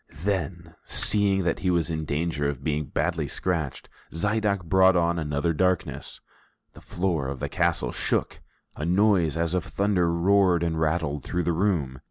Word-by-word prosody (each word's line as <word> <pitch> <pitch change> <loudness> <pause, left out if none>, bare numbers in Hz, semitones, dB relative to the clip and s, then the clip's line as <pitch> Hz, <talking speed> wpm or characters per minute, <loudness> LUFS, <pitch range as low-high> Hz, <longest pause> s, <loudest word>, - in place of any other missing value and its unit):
Then, 85 -4 -2
seeing 100 -2 +2
that 85 - 0
he 95 - 0
was 85 -2 +1
in 80 -1 -3
danger 75 -1 -1
of 70 -2 -6
being 75 0 -1
badly - - -1
scratched, 80 -7 -2 0.2
Zidoe 100 +2 0
brought 95 +2 +4
on 85 0 +1
another 75 +1 -1
darkness, 90 +2 -1 0.5
the - - -14
floor 85 -6 -2
of 65 -1 -5
the - - -2
castle 85 -1 0
shook, - - -2 0.3
a - - -6
noise 90 -2 +2
as 85 0 0
of 90 -2 0
thunder 95 -4 0
roared 90 0 +3
and 80 -1 -1
rattled 80 -2 -1
through 90 0 -2
the 85 - 0
room. 80 -8 0
85 Hz, 165 wpm, -25 LUFS, 80-95 Hz, 0.5 s, brought